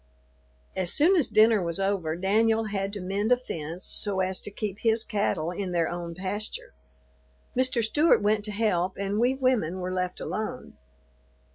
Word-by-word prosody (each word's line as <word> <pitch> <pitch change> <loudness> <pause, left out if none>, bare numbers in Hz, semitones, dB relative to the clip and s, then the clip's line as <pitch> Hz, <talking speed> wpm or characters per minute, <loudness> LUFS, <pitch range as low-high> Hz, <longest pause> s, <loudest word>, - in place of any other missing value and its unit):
As 185 -1 0
soon 335 +6 +4
as 325 -7 +2
dinner 215 -1 +5
was 170 0 -2
over, 195 -5 0
Danyul 220 +3 +2
had 195 -1 -2
to 205 - -4
mend 200 +5 -1
a 250 - +6
fence 170 -7 -6
so 200 -3 0
as 185 0 -1
to - - -6
keep 205 0 -5
his 225 -1 +2
cattle 195 -6 -1
in 180 0 -4
their 170 -2 +1
own 170 -1 -5
pasture. 215 - -4 0.8
Mr. 255 -2 +2
Stewart 295 +9 +4
went 210 0 +2
to 210 - -4
help 190 -4 0
and 200 +2 -2
we 250 +3 +2
women 250 -10 +1
were 185 0 -3
left 180 -1 -2
alone. 215 0 -5
200 Hz, 170 wpm, -27 LUFS, 185-225 Hz, 0.8 s, a